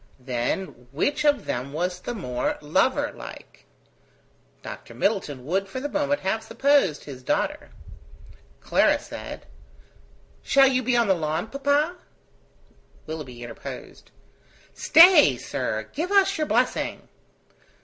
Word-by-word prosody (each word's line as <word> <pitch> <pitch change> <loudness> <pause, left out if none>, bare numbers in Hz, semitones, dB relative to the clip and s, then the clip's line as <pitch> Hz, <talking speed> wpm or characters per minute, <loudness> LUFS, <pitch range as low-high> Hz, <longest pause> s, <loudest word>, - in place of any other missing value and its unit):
Then 125 +2 -3
which 280 - 0
of 290 -1 +3
them 130 +3 -4
was 180 +3 -2
the 240 - -5
more 125 - -2
lover 260 - +1
like? - - -12 1.0
Dr. - - -9
Middleton 150 - -1
would 190 +6 -1
for 260 - -6
the 285 - -3
moment 285 -1 -1
have 190 +4 -1
supposed 240 - +2
his 135 -3 -9
daughter. 125 - -2 0.9
Clara - - +3
said: - - -9 1.0
"Shall 275 0 +5
you 260 -1 +2
be 250 0 +1
on 235 -2 +3
the 195 - +4
lawn, 165 +4 -2
papa?" 285 +5 +1 1.1
Willoughby 135 -7 -7
interposed. 120 -1 -9 0.6
"Stay, 325 - +7
sir; 110 -4 -3
give 335 +7 -3
us 395 0 +4
your 310 -2 -1
blessing." - - 0
195 Hz, 120 wpm, -24 LUFS, -, 1.1 s, Stay